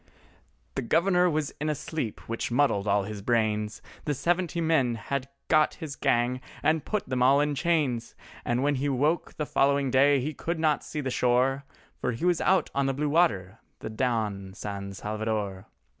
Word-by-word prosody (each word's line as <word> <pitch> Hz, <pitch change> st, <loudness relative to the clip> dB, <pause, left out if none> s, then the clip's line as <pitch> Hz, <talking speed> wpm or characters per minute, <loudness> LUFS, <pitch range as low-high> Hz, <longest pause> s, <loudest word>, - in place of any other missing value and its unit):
The -, -, -2 dB
Governor 180 Hz, +7 st, +3 dB
was 155 Hz, -2 st, -1 dB
in 155 Hz, -, 0 dB
a 150 Hz, -, 0 dB
sleep 145 Hz, -5 st, -4 dB
which 115 Hz, 0 st, -3 dB
muddled 120 Hz, -6 st, +2 dB
all 100 Hz, 0 st, +3 dB
his 105 Hz, 0 st, -6 dB
brains, 105 Hz, -1 st, 0 dB, 0.2 s
The 145 Hz, -, 0 dB
seventy 175 Hz, +3 st, 0 dB
men 155 Hz, -8 st, +2 dB
had 135 Hz, +4 st, -4 dB, 0.2 s
got 155 Hz, -1 st, +3 dB
his 155 Hz, -5 st, -6 dB
gang 120 Hz, +2 st, +1 dB, 0.2 s
and 155 Hz, -1 st, +2 dB
put 210 Hz, -2 st, -2 dB
them 130 Hz, -1 st, -1 dB
all 135 Hz, +3 st, +5 dB
in 150 Hz, 0 st, +1 dB
chains, 140 Hz, -7 st, 0 dB, 0.3 s
And 120 Hz, +2 st, 0 dB
when 145 Hz, +1 st, +2 dB
he 145 Hz, -, +1 dB
woke 145 Hz, +5 st, 0 dB
the 150 Hz, -, -2 dB
following 140 Hz, -1 st, +2 dB
day 140 Hz, +2 st, +5 dB
he 150 Hz, +5 st, -3 dB
could 170 Hz, +3 st, -3 dB
not 155 Hz, -2 st, +1 dB
see 150 Hz, -, -4 dB
the 130 Hz, -2 st, -3 dB
shore, 130 Hz, +3 st, +2 dB, 0.3 s
For 125 Hz, -, -1 dB
he 115 Hz, +10 st, -3 dB
was 175 Hz, -2 st, +2 dB
out 190 Hz, -, +2 dB
on 140 Hz, 0 st, +1 dB
the 135 Hz, -, 0 dB
blue 150 Hz, +2 st, -1 dB
water—the 115 Hz, -, 0 dB
Don 110 Hz, -5 st, -2 dB
San 100 Hz, -1 st, -5 dB
Salvador. 105 Hz, -2 st, -3 dB
135 Hz, 180 wpm, -27 LUFS, 115-155 Hz, 0.3 s, all